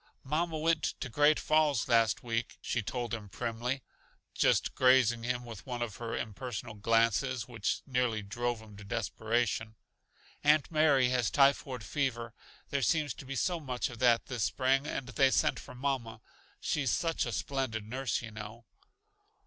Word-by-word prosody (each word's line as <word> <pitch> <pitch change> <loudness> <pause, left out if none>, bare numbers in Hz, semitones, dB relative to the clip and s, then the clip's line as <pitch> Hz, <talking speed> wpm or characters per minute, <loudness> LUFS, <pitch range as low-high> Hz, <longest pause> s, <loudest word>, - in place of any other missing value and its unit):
"Mamma 160 +4 -1
went 160 0 +2 0.2
to 125 - -4
Great 145 +6 +4
Falls 155 -6 +2
last 115 -5 +3
week," 115 -1 -2
she 120 - -1
told 120 +2 -4
him 105 -3 -5
primly, 120 +4 -3 0.5
just - - +2
grazing 130 -3 +4
him 125 +1 -2
with 115 -2 -9
one 120 -2 -2
of 110 -4 -6
her 115 -1 -4
impersonal 115 0 -5
glances 115 +3 +1
which 115 -5 -2
nearly 125 -5 0
drove 120 +2 -3
him 105 -2 -14
to 100 - -10
desperation. 110 +1 -1 0.7
"Aunt 150 0 +4
Mary 145 -5 +4
has 125 -3 +1
typhoid 135 -3 +2
fever 115 +1 -2 0.4
there 140 - 0
seems 150 -1 +1
to - - -11
be 135 - -4
so 175 +6 0
much 130 -2 -3
of 120 - -10
that 120 -2 +4
this 120 -4 -3
spring 135 +2 +1
and 135 -4 -3
they 135 +1 +4
sent 130 - +2
for - - -11
mamma. 125 -4 -2 0.4
She's 145 -4 0
such 165 +5 0
a - - -3
splendid 130 -6 -2
nurse, 130 +3 -2
you 115 - -7
know." 110 +2 -9
125 Hz, 165 wpm, -31 LUFS, 115-135 Hz, 0.7 s, Great